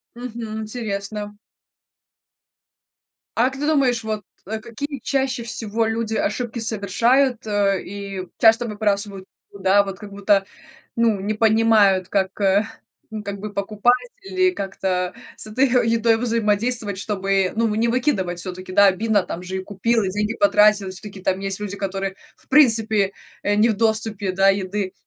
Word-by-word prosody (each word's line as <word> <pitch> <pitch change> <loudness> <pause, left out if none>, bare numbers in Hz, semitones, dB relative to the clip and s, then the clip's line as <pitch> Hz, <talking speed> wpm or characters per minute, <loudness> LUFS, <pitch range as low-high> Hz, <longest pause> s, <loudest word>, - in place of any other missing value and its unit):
Мгм, 230 -3 -6
интересно. 210 -2 -5 2.0
А 235 - +4
как 265 0 -9
ты 295 - -1
думаешь, 260 -7 +2
вот, 215 -1 -3 0.2
а, 220 +2 -4
какие 275 +6 -6
чаще 265 -3 -1
всего 225 -1 -2
люди 225 0 -2
ошибки 235 +3 -2
совершают, 230 +4 +1
э, 200 -2 +1
и 195 -1 -6
часто 225 +1 +5
выбрасывают? 205 -2 -1 0.3
Ну 200 - -12
да, 195 +1 +4
вот 195 -1 -7
как 210 -2 -10
будто, 200 0 +2 0.5
ну, 230 -4 +2
не 205 +3 -2
понимают, 215 -4 +4
как, 190 -1 -1
э, 200 +1 +3 0.5
ну, 215 -1 -5
как 200 -1 -5
бы 210 0 -6
покупать 210 +4 +1 0.3
или 370 -1 +1
как-то 190 - -2 0.2
с - - -6
этой 255 +6 +2 0.2
едой 230 0 +3
взаимодействовать, 225 -2 0
чтобы, 195 -2 0
ну, 230 +1 +2
вы 210 -1 -1
не 230 +2 +2
выкидывать 230 -8 0
всё-таки. 185 +1 -6
Да, 200 +2 +6
обидно: 205 +2 +2
там 175 - -6
же 185 +1 -5
и 190 - -4
купил, 220 +4 0
и 190 - -1
деньги 210 +3 -1
потратил, 210 -8 +4
и - - -5
всё-таки 195 +1 -9
там 190 +1 -1
есть 195 -1 -3
люди, 200 -1 -4
которые, 195 -1 -3 0.2
в - - -25
принципе, 225 -8 +4 0.3
э, 205 - +1
не 215 +3 +4
в 220 - 0
доступе, 220 -2 0
да, 195 +1 +3
еды, 195 0 -2
210 Hz, 160 wpm, -22 LUFS, 195-230 Hz, 2.0 s, Да